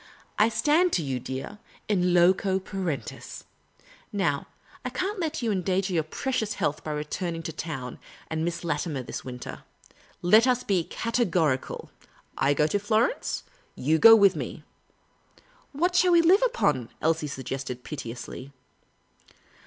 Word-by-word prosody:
" - - -15
I 215 +2 +5
stand 300 +11 +3
to 170 - +1
you, 130 -3 -2
dear, 130 - -6 0.3
in 180 -4 +2
loco 185 +2 +4
parentis. 185 - -5 0.7
Now, 175 -9 0 0.4
I 250 - -2
can't 375 - -3
let 320 -6 -2
you 225 - +1
endanger 190 0 0
your 165 - +3
precious 220 - -2
health 150 +1 -1
by - - -5
returning 165 +3 -3
to 160 - -5
town 135 -6 -5 0.3
and 160 0 -2
Miss 170 0 -3
Latimer 165 -5 -2
this - - -6
winter. 125 -1 -7 0.6
Let 215 +7 +6
us 250 -1 +2
be 185 -5 +1
categorical. 180 - -1 0.4
I 140 +1 +2
go 150 - +3
to 200 +6 0
Florence; 215 +4 0 0.3
you 155 +4 +1
go 225 +4 +10
with 200 -3 +5
me." - - -6 0.6
" - - -30 0.3
What 350 +6 0
shall 360 -1 +5
we 335 -1 +6
live 370 +5 +6
upon? 460 - +1
" - - -36
Elsie 160 -1 +1
suggested, 130 -2 -5
piteously. 130 -1 -7
180 Hz, 150 wpm, -27 LUFS, 150-225 Hz, 0.7 s, go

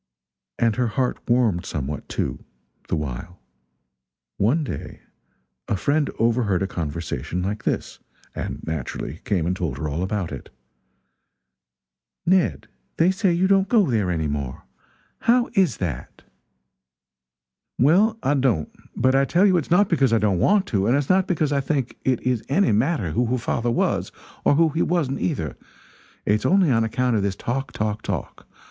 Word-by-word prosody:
And 115 -2 +1
her 125 -1 +2
heart 125 +3 -1
warmed 115 -8 +2
somewhat, 75 0 -5
too, - - -3 0.4
the - - 0
while. 75 +4 -5 1.0
One 135 +11 +2
day 90 - -6 0.7
a 105 - 0
friend 145 +8 +1
overheard 115 -5 +1
a - - -1
conversation 85 0 -4
like 105 +3 -3
this: - - -2 0.3
and - - -5
naturally 80 +1 -4
came 90 -6 0
and 90 +2 0
told 85 -8 -3
her 75 - -3
all 75 +3 -3
about 95 -3 -2
it: 70 - -8 1.8
"Ned, 185 0 +2 0.3
they 175 +3 +4
say 190 0 +1
you 170 +2 +2
don't 195 0 +3
go 210 - +3
there 105 -5 +1
any 80 -3 -1
more. 70 -4 -4 0.6
How 245 +1 +2
is 185 - +2
that?" 80 -9 -5 1.5
"Well, 195 - +4
I 140 - +2
don't; 125 - +1 0.2
but 130 +2 +2
I 135 0 +4
tell 175 +8 +3
you 190 -2 +4
it's 165 - -2
not 195 +4 +4
because 135 -9 +2
I - - +5
don't 100 -5 +1
want 200 - +3
to 100 -4 +1
and 125 +4 +3
it's 145 -1 -2
not 185 0 +3
because 155 -5 0
I 140 -1 +2
think 135 -3 -2
it 130 -3 +1
is 125 -3 0
any 185 +8 +3
matter 110 - +1
who 120 +7 +1
her 125 +2 0
father 120 0 -1
was 120 - 0 0.3
or - - +5
who 165 +1 +4
he 160 +2 -1
wasn't, 155 -6 0
either; 80 - -2 0.7
it's 105 +1 +2
only 185 -5 +4
on 115 -2 +3
account 125 +2 0
of 105 - +2
this 100 -1 -1
talk, 130 +5 -3
talk, 105 0 -2
talk. - - -5
120 Hz, 165 wpm, -23 LUFS, -, 1.8 s, I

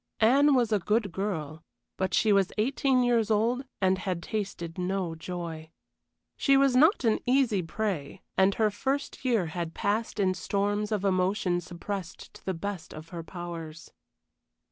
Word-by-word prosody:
Anne 275 +6 +5
was 240 -3 +2
a 210 - +3
good 210 +2 0
girl, 165 -5 -4 0.3
but 190 0 -1
she 215 -3 +3
was 195 -2 +3
eighteen 255 +3 +2
years 235 -3 +2
old 230 +4 +2 0.2
and 190 -1 +2
had 185 -3 -3
tasted 190 -5 -4
no 180 -1 -1
joy. 165 -1 -6 0.7
She 275 -1 +4
was 270 -2 +4
not 310 - +5
an 225 -2 +3
easy 250 -6 +3
prey, 175 -2 -3
and 190 +1 +4
her 215 -2 +2
first 275 +7 -3
year 235 -8 +2
had 165 0 -4
passed 215 +2 -1
in 190 -2 +3
storms 205 +3 -1
of 205 -2 0
emotion 185 -1 +1
suppressed 175 +2 -7
to - - -15
the 190 - -2
best 195 0 -5
of 155 +1 -10
her 170 -2 -6
powers. 165 -2 -8
195 Hz, 160 wpm, -28 LUFS, 175-225 Hz, 0.7 s, Anne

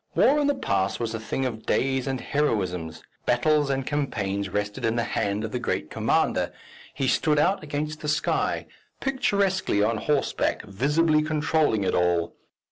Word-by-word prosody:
War 290 +3 +5
in 290 - +2
the 285 - +2
past 95 0 0
was 115 -1 -2
a 110 - -3
thing 130 +4 -2
of 115 -3 -5
days 130 -1 +1
and 135 -1 -1
heroisms; 90 - -1 0.2
battles 145 +4 +3
and 135 -1 -1
campaigns 100 -10 -2
rested 105 +2 -3
in 115 0 +1
the 120 - +1
hand 105 -1 -1
of 110 - -4
the 125 - -2
great - - -2
commander, - - +1 0.4
he 135 0 -2
stood 150 +3 +2
out 180 +7 +2
against 150 +1 -4
the 150 - -4
sky, 155 +1 0 0.3
picturesquely 200 - +1
on 110 +1 +1
horseback, 145 +4 0
visibly 150 +9 +2
controlling 155 -7 +1
it - - 0
all. 85 -1 +1
135 Hz, 165 wpm, -25 LUFS, 105-155 Hz, 0.4 s, War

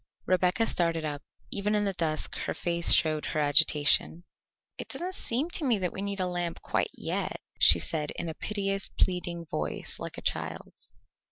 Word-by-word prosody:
Rebecca 185 +4 +2
started 165 -5 0
up; 145 -1 -4 0.3
even 210 +1 0
in 205 0 +1
the 195 - -1
dusk 160 -3 -1
her - - -2
face 170 -1 +1
showed 155 -1 +4
her 155 - -2
agitation. 150 +2 +3 0.6
"It - - -5
doesn't 365 +2 -4
seem 280 +2 -1
to 330 - +2
me 245 -6 +2
that 180 -3 -2
we 190 - -5
need 200 0 -3
a 185 - 0
lamp 175 -2 -3
quite - - 0
yet," - - -3 0.2
she 80 - +9
said 150 - -2
in 170 - -4
a 160 - -4
piteous, 195 +1 -2
pleading 175 -2 -1
voice 75 - -4
like - - -7
a - - -7
child's. - - -4
175 Hz, 180 wpm, -28 LUFS, 155-200 Hz, 0.6 s, she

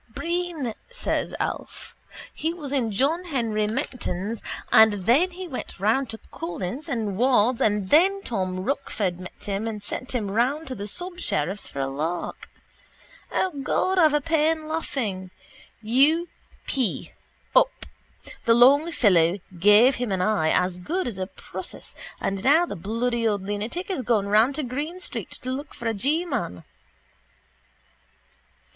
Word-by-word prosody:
—Breen, 340 -8 -2 0.2
says - - -2
Alf. - - -5 0.4
He 325 +2 -2
was 295 -6 -7
in 250 -6 0
John 290 - +1
Henry 230 -9 0
Menton's 225 -4 -3 0.3
and 220 -1 +7
then 275 - +4
he 365 +1 -7
went 260 - -7
round 225 +6 +2
to 225 - -5
Collis 180 - -4
and 220 -7 -2
Ward's 245 -1 +3
and 205 -3 +1
then 390 +6 +4
Tom 185 -4 -2
Rochford 205 -7 -2
met 180 - -9
him 200 +2 -2
and 210 -2 -5
sent 255 +5 -4
him 215 -6 -1
round 260 +9 +1
to - - -3
the 205 -3 -6
subsheriff's 350 - -2
for 140 - -5
a - - +1
lark. 155 +6 -4 0.8
O 375 - +1
God, 370 +7 +1
I've 310 -3 +5
a 295 - +2
pain 315 0 +1
laughing. 225 - -3 0.5
U. 285 +10 +4 0.4
p: 255 -7 -1 0.4
up. - - +3 0.6
The 230 - +5
long 280 +7 +6
fellow 180 - +4 0.2
gave 210 +8 +6
him 245 -3 -2
an 190 - 0
eye 185 -6 +2
as 180 +1 +1
good 345 - -2
as 210 -6 -5
a 185 - -2
process - - -9 0.3
and 195 0 -2
now 315 +6 +5
the 340 - -6
bloody 230 +5 -1
old 205 -3 0
lunatic 215 - -3
is 325 - -1
gone 220 -4 +1
round 220 +7 +4
to 305 - -2
Green 290 +8 -4
street - - -6
to 255 - -3
look 280 +3 -5
for 235 - -9
a 225 - +1
G 290 - 0
man. 90 - -3
240 Hz, 150 wpm, -25 LUFS, 205-305 Hz, 0.8 s, and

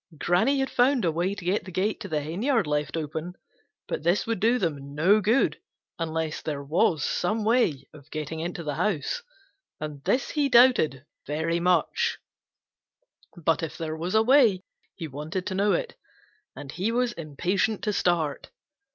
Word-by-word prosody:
Granny 220 - +2
had 270 - -2
found 250 -3 +3
a 165 - +2
way 175 +5 -1
to 190 -4 -9
get 190 +4 +1
the 185 - -9
gate 195 +5 -1
to 205 - -6
the 155 -4 -1
henyard 205 - 0
left 150 +1 -1
open, 160 +3 -4 0.5
but - - -3
this 175 +5 +1
would 225 -3 -2
do 230 +5 +3
them 145 - -3
no 190 +8 +4
good 225 +7 +2 0.4
unless 160 -1 -2
there 145 -2 -4
was 155 0 +1
some 210 +5 -1
way 215 - +2
of 150 0 -15
getting 155 +1 -5
into 170 +1 -4
the 150 -2 -3
house, 185 - -1 0.6
and 150 -2 -6
this 255 - 0
he 290 -2 +1 0.8
very 160 +3 -1
much 180 - +1 0.7
doubted. 170 -3 -22
But 165 -2 +3
if 165 - -5
there 160 -1 -4
was 175 +5 -3
a 220 - +5
way 230 -7 +4 0.3
he 165 -4 -6
wanted 155 +6 -5
to 190 - -3
know 200 +2 +2
it, 475 -1 -2 0.6
and 140 -1 -8
he 190 +8 -1
was 245 0 0
impatient 180 +7 -1
to 210 - 0
start. 165 -7 0
175 Hz, 170 wpm, -26 LUFS, 155-215 Hz, 0.8 s, a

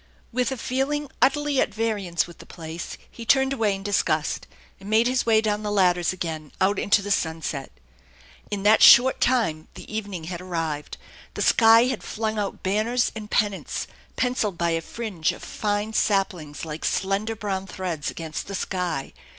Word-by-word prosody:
With 250 +1 0
a 265 - -3
feeling 270 +4 -2
utterly 280 +1 +3
at - - 0
variance 205 -6 -1
with 170 -2 -14
the - - -13
place 165 0 -7
he 235 - -9
turned 265 +3 +3
away 220 -6 +1
in 195 - -8
disgust, 165 -6 0 0.3
and 195 +1 -10
made 220 +2 +4
his 250 -1 +1
way 220 -1 +5
down 210 -1 0
the 210 - -3
ladders 180 -4 +3
again, 160 -5 -5
out 195 +2 +2
into 200 0 +3
the 205 - -4
sunset. 160 -6 -2 0.8
In 200 -2 -3
that 215 +2 +5
short 260 +2 +8
time 220 -12 +1
the - - -9
evening 200 -6 -4
had 175 +2 -6
arrived. 165 -5 -4 0.4
The - - -1
sky 225 0 +6
had 255 -3 -2
flung 220 0 -3
out 200 -1 -4
banners 215 +6 +1
and 215 -1 -7
pennants, 205 -2 -1 0.3
pencilled 235 -7 0
by 170 0 +1
a 165 0 0
fringe 200 -6 -2
of - - -12
fine 210 +1 -2
saplings 185 -9 0
like 155 0 -6
slender 195 +4 0
brown 195 -3 -3
threads 175 -6 -3
against 160 -2 -6
the 195 - -5
sky. 180 -7 -3
205 Hz, 175 wpm, -24 LUFS, 170-225 Hz, 0.8 s, short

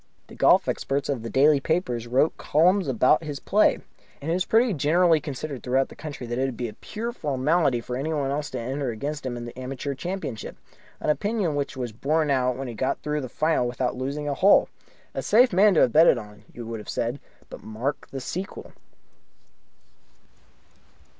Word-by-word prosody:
The - - -12
golf - - +4
experts 140 +1 -2
of 135 -5 -1
the 115 - -6
daily 145 +3 +4
papers 135 -7 -1
wrote 130 +6 +2
columns 180 +4 +2
about 130 +5 +3
his 145 -3 -5
play. 210 +2 +3 0.4
And 150 +3 -3
it - - +2
was 180 +1 0
pretty 225 0 +3
generally 165 +2 +3
considered 145 -2 -6
throughout 130 +1 +1
the - - -12
country 145 -5 -7
that 120 +1 -3
it 135 - +2
would 130 -4 -4
be 120 - -2
a 110 - -8
pure 230 +3 -5
formality 145 - +1
for 125 +1 -5
anyone 140 0 -1
else 145 +1 -2
to - - -5
enter 130 +3 -3
against 140 +5 -4
him 120 -1 -4
in 120 - -6
the 120 - -9
Amateur 130 +2 -4
Championship 155 - -5 0.4
an - - +1
opinion 205 -1 -1
which 140 -1 -3
was 125 -3 -3
borne 150 +6 0
out 125 -2 +1
when 135 0 -5
he 120 - -6
got 130 +4 -1
through 150 0 -1
into 140 -3 -3
the - - -21
final 155 -6 +1
without 125 +1 -2
losing 140 +3 -4
a 145 - 0
hole. 195 +8 +5 0.4
A - - -3
safe 245 0 +4
man 200 +1 +5
to - - +5
have 120 - +3
betted 160 -3 +6
on, 105 -2 -10
you 120 - -8
would 115 0 -5
have 105 - -10
said. 120 +4 -2 0.3
But - - -9
mark 120 +6 -4
the 135 - -5
sequel. 185 +9 -6
140 Hz, 200 wpm, -25 LUFS, 125-160 Hz, 0.4 s, betted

